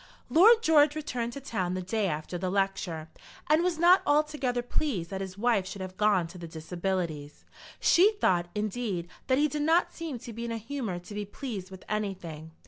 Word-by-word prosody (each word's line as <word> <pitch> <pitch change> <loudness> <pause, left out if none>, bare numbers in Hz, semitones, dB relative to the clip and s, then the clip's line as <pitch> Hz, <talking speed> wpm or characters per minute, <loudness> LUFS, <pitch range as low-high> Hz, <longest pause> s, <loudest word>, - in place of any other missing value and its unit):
Lord 450 +7 +7
George 300 -2 +5
returned 245 -6 -3
to 280 - -6
town 190 -9 -2
the 185 - -2
day 210 +2 0
after 155 +1 -4
the 185 +1 -1
lecture, 190 -5 -1 0.4
and 310 +2 +4
was 350 -2 0
not 350 +3 +6
altogether 290 -5 +1
pleased 235 - -2
that 195 0 -3
his 190 0 -6
wife 215 -4 +2
should 195 0 -7
have 185 0 -8
gone 205 -3 +3
to 180 - -11
the 170 - -7
Disabilities. 165 -2 -4 0.3
She 395 +6 +5
thought, 180 - +1
indeed, 210 -4 -2 0.2
that 260 - +3
he 300 +2 +4
did 300 0 -3
not 325 +4 +3
seem 325 -6 -5
to 235 0 -9
be 230 +2 -6
in 235 - -3
a 230 - -2
humour 230 -4 -4
to 175 +4 -10
be 205 0 -3
pleased 205 -3 -6
with 190 -1 -12
anything. 185 -7 -4
210 Hz, 200 wpm, -29 LUFS, 185-285 Hz, 0.4 s, Lord